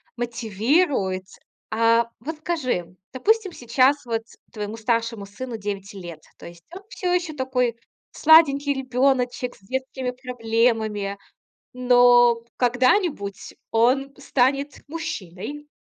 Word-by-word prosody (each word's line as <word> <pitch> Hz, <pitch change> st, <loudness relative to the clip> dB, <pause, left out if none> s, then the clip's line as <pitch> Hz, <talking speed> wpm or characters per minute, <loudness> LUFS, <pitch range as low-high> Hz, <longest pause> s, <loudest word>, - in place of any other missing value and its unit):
мотивирует. 230 Hz, -, 0 dB, 0.5 s
А, 230 Hz, +1 st, +3 dB
вот 305 Hz, +6 st, -6 dB
скажи, 255 Hz, -, -2 dB, 0.2 s
допустим, 410 Hz, -, +1 dB
сейчас 260 Hz, 0 st, +2 dB
вот 230 Hz, -1 st, -1 dB, 0.3 s
твоему 210 Hz, 0 st, -5 dB
старшему 230 Hz, -2 st, -1 dB
сыну 230 Hz, +4 st, -7 dB
9 200 Hz, -1 st, -5 dB
лет. 175 Hz, -5 st, -9 dB, 0.2 s
То -, -, -13 dB
есть, 170 Hz, 0 st, -14 dB
он 380 Hz, -, -8 dB
всё 360 Hz, -5 st, -2 dB
ещё 355 Hz, -3 st, -1 dB
такой 255 Hz, -3 st, 0 dB, 0.4 s
сладенький 290 Hz, -3 st, +5 dB
ребёночек 255 Hz, -1 st, 0 dB
с -, -, -22 dB
детскими 260 Hz, +3 st, -4 dB
проблемами, 225 Hz, -5 st, -1 dB, 0.6 s
но 245 Hz, -1 st, +5 dB
когда-нибудь 250 Hz, -, +1 dB, 0.2 s
он 260 Hz, +4 st, +2 dB
станет 275 Hz, +1 st, 0 dB
мужчиной 295 Hz, -, -6 dB
245 Hz, 105 wpm, -23 LUFS, 225-275 Hz, 0.6 s, сладенький